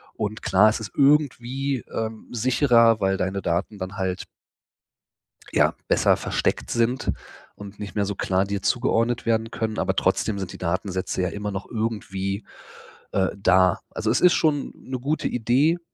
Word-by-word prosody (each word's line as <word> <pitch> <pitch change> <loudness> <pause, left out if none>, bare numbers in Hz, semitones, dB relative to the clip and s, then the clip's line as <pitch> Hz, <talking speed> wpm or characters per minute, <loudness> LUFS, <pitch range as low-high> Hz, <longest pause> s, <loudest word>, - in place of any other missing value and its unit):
Und 105 +1 -3
klar, 105 +3 +5
ist 110 - -2
es 110 - -6
irgendwie, 135 -2 +2
ähm, 110 -1 -4
sicherer, 120 -2 +4
weil 95 0 +1
deine 95 +1 -2
Daten 90 +5 -1
dann 95 +1 -5
halt 95 -1 -2 1.3
ja, - - +3
besser - - +4
versteckt - - -1
sind 120 +2 +1 0.4
und 100 0 -11
nicht 105 -1 -7
mehr 105 - +1
so 100 +1 -3
klar 95 0 +1
dir 100 0 -3
zugeordnet 120 -1 +1
werden 115 0 +1
können. 110 -2 -3
Aber - - 0
trotzdem 105 -3 +1
sind 95 -2 -5
die - - -10
Datensätze 95 +1 -2
ja 90 - +1
immer 105 +2 -4
noch 95 0 -6
irgendwie, 105 -3 -3 0.7
äh, 95 -1 +2
da. 95 -1 +3
Also, 110 0 -2
es 125 - +2
ist 180 -1 +6
schon 150 -3 +1
'ne 130 -1 -6
gute 145 +5 -1
Idee. 130 +8 +2
110 Hz, 160 wpm, -24 LUFS, 95-120 Hz, 1.3 s, ist